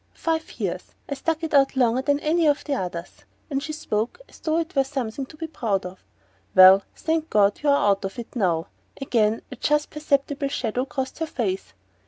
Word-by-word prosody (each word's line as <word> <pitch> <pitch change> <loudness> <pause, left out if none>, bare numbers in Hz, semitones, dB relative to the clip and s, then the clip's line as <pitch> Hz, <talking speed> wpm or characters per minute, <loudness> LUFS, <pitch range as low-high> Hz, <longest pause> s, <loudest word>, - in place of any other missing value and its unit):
"Five 320 -1 -2
years. - - -2 0.3
I - - -3
stuck 325 +3 -2
it 320 - -3
out 275 -1 +4
longer 250 -1 +3
than 285 +1 +1
any 325 +1 +2
of 290 0 +2
the 290 - -2
others." 175 -8 -5 0.4
She 305 +2 -5
spoke 230 - -2
as - - -17
though 315 0 0
it 335 +1 -2
were 275 - +4
something 265 -1 -4
to 310 - -15
be 325 - -4
proud 220 - -2
of. 180 +1 -9 0.5
"Well, 185 +1 +9
thank 320 0 -1
God 200 -1 +3
you're 290 -1 +3
out 205 -8 +3
of 195 +3 -5
it 235 +1 -8
now!" 170 -7 +1 0.3
Again 225 -5 +1
a 260 - -7
just 295 +4 +1
perceptible 285 -1 0
shadow 250 -2 -2
crossed 265 +2 -4
her 320 - -1
face. 200 -10 -3
270 Hz, 195 wpm, -24 LUFS, 215-300 Hz, 0.5 s, Well